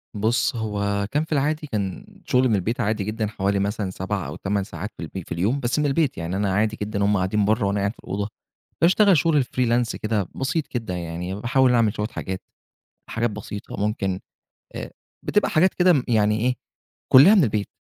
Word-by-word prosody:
بُص، 110 +4 +1
هو 100 -2 -1
كان 150 +2 +1
في 160 - -25
العادي، 150 +1 0
كان 100 -6 -3 0.2
شغل 130 +1 +3
من 110 - +3
البيت 105 +5 -1
عادي 105 -1 0
جدًا، 110 +1 -2
حوالي 100 -1 -1
مثلًا 100 0 -1
7 95 0 -3
أو - - -6
8 100 0 -1
ساعات 105 +1 -6
في - - -6
الب 85 +3 -7
في - - -17
اليوم، 100 +12 0
بس 125 +2 0
من 150 - +1
البيت 145 0 +1
يعني، 85 +3 -3
أنا 100 -1 0
عادي 110 +2 +1
جدًا، 100 -1 -1
هُم 105 -1 +3
قاعدين 100 +3 +1
بره، 110 +1 +2
وأنا 100 +1 0
قاعد 100 +1 0
في - - -21
الأوضة 100 +1 -3 0.5
باشتغل 190 +2 +5
شغل 150 -1 +3
الfreelance 120 -2 0
كده 105 -4 -1
بسيط 145 +4 -1
كده 115 -7 -4
يعني، 90 +2 -4
باحاول 125 +4 +2
أعمل 115 -3 +3
شوية 105 - -2
حاجات، 95 -4 -5 0.7
حاجات 115 0 0
بسيطة، 105 -1 -7
ممكن 100 -2 -1 0.5
آآ - - -6 0.3
بتبقى 210 - +1
حاجات 175 +4 +3
كده 175 -7 +4
يعني 105 -1 +2
ايه، 125 +2 +1 0.6
كلها 145 +11 +9
من 190 -8 +5
البيت، 105 -2 -1
105 Hz, 195 wpm, -23 LUFS, 100-125 Hz, 0.7 s, كلها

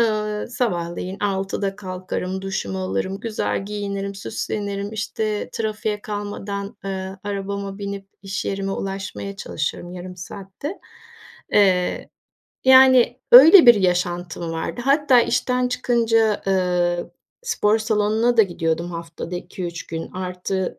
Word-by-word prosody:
Eee, 215 -2 0
sabahleyin 185 -6 -2
6'da 195 0 -1
kalkarım, 185 -1 -4
duşumu 145 - -3
alırım, 95 - -2
güzel 215 -3 -2
giyinirim, 200 -1 -4
süslenirim, 200 0 -4
işte, 215 0 -2
trafiğe 215 -1 -2
kalmadan, 205 -1 -5
eee, 190 0 -4
arabama 200 0 -4
binip 200 -1 -5 0.2
iş 195 -1 -4
yerime 195 0 -2
ulaşmaya 195 0 -5
çalışırım 175 0 -4
yarım 180 0 -8
saatte. 195 - -7 0.7
Eee, 185 -3 +3 0.6
yani, 260 -2 +6
öyle 315 +7 +10
bir 240 - +10
yaşantım 175 -3 -1
vardı. 165 +8 -4
Hatta 275 -2 +5
işten 250 +1 +1
çıkınca, 230 -3 +2
eee, 180 -2 +1 0.4
spor 225 - +2
salonuna 220 +2 +1
da 225 - +8
gidiyordum 170 -2 -2
haftada 170 +1 -6
2-3 175 -1 -6
gün. 165 0 -5
Artı, 185 0 -3
200 Hz, 115 wpm, -22 LUFS, 180-215 Hz, 0.7 s, öyle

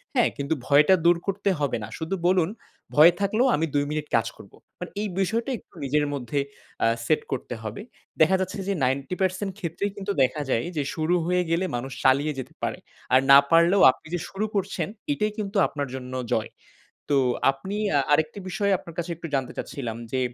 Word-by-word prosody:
হ্যাঁ? 245 - +4
কিন্তু 140 +2 -1
ভয়টা 150 +6 +6
দূর 170 0 +6
করতে 200 +1 0
হবে 145 -4 0
না। 105 - -5
শুধু 160 +4 -3
বলুন, 180 -2 +3 0.5
"ভয় 160 +4 +9
থাকলেও 215 +6 +2
আমি 160 - 0
২ 145 - +3
মিনিট 150 -1 -3
কাজ 115 -1 +2
করবো।" 100 - -15 0.2
মানে 180 - -6
এই 215 - -1
বিষয়টা 225 +7 0
একটু - - -22
নিজের 145 +2 +1
মধ্যে 140 0 -2 0.5
আ - - +5 0.2
সেট 155 - +2
করতে 125 -1 -3
হবে। 110 0 -5 0.4
দেখা 165 +4 +6
যাচ্ছে 190 +1 -3
যে 200 - +1
90% 180 +9 -1
ক্ষেত্রেই 190 +3 -3
কিন্তু 200 0 -3
দেখা 140 +4 0
যায় 115 - +1
যে, 145 - +1
শুরু 160 +2 +1
হয়ে 180 +1 +2
গেলে 170 +3 +1
মানুষ 125 +3 -4
চালিয়ে 140 +3 +3
যেতে 130 - -7
পারে, - - -1 0.4
আর 130 - +8
না 140 - +11
পারলেও 170 +4 +5
আপনি 160 - -17
যে - - -2
শুরু 200 +2 -2
করছেন 190 -4 -1 0.3
এটাই 215 -5 -1
কিন্তু 205 0 -3
আপনার 145 -2 -4
জন্য 130 0 -7 0.2
জয়। 110 - -1 0.6
তো 140 - +5 0.3
আপনি 135 +10 -6 0.2
আ - - +5
আরেকটি 155 +5 +1
বিষয় 200 +1 0
আপনার 170 - -12
কাছে 175 +1 -3
একটু 165 - -7
জানতে 135 -2 -1
চাচ্ছিলাম 120 -5 -5 0.2
যে 130 - +1
160 Hz, 190 wpm, -25 LUFS, 140-190 Hz, 0.6 s, না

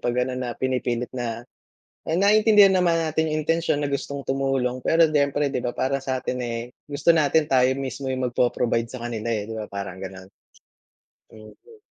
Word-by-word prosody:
'pag 120 0 -1
ano, 130 - -4
na 120 -2 -4
pinipilit 125 -2 -2
na, 120 -2 -4 0.6
eh, 160 - -1
naiintindihan 210 +1 +6
naman 175 -2 +3
natin 160 0 0
yung 155 0 -1
intensiyon 165 -2 0
na 140 - -1
gustong 140 0 -3
tumulong 135 -2 -1
pero 165 +4 +3
siyempre 145 -1 +1
'di - - -2
ba 120 0 -3
parang 135 +1 0
sa'tin, 130 -1 -3
eh, 120 0 -4 0.2
gusto 150 +3 +1
natin 155 -1 +3
tayo 130 -1 +5
mismo 135 0 -5
yung 130 -1 -1
magpo-provide 120 -1 0
sa 120 0 -9
kanila, 120 -2 -4
eh, 105 +1 -4
'di 110 - -5
ba 105 - -5
parang 100 -2 -6
gano'n? 95 0 -9 1.0
Thank 110 -1 -14
you. 455 -2 -16
130 Hz, 180 wpm, -24 LUFS, 120-150 Hz, 1.0 s, naiintindihan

